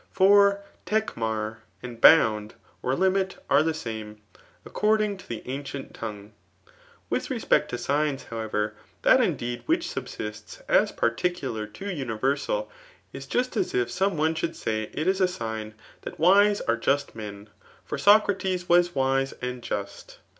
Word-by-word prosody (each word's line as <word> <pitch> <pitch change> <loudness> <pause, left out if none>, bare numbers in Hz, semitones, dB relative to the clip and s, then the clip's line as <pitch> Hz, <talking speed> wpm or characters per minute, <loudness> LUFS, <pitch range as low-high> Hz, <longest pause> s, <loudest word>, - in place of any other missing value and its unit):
For 200 +1 +5 0.2
iSdhMr, 110 - -1 0.3
and 120 -2 -8
bounds 110 -9 +5 0.3
or 130 - 0
Smiif 190 +2 +1 0.2
are 145 - +6
the 160 0 0
same, 110 -6 -6 0.5
according 215 -1 +1
to 185 - -15
the 115 -2 -5
ancient 140 +1 -6
tongneb 105 -2 -7 0.8
With - - -1
respect - - +1
to - - -3
signs, 145 -1 -1
however, 110 -2 -3 0.3
that - - +6
indeed 120 0 -1
which - - +1
sub* - - -5
sitts 105 0 -8
as - - +3
particular 120 -3 -1
to 195 - -6
universal, 140 - -1 0.4
is - - -8
just 250 +1 -1
as - - -1
if 120 -1 0
some 190 -2 0
mm 160 +2 +1
should 165 +1 -2
say 110 -1 -3
it 155 - -3
is 190 +1 +2
a - - +6
^;tt 110 -10 -4 0.3
that^mae 200 +5 +4
are 115 0 +2
just 140 +4 0
men; 105 -2 -8 0.4
&rSociaiea 195 -3 +3
was 175 -1 +4
wise 135 0 +1
and 125 0 -4
just. 100 -3 -6
135 Hz, 145 wpm, -26 LUFS, 110-185 Hz, 0.8 s, are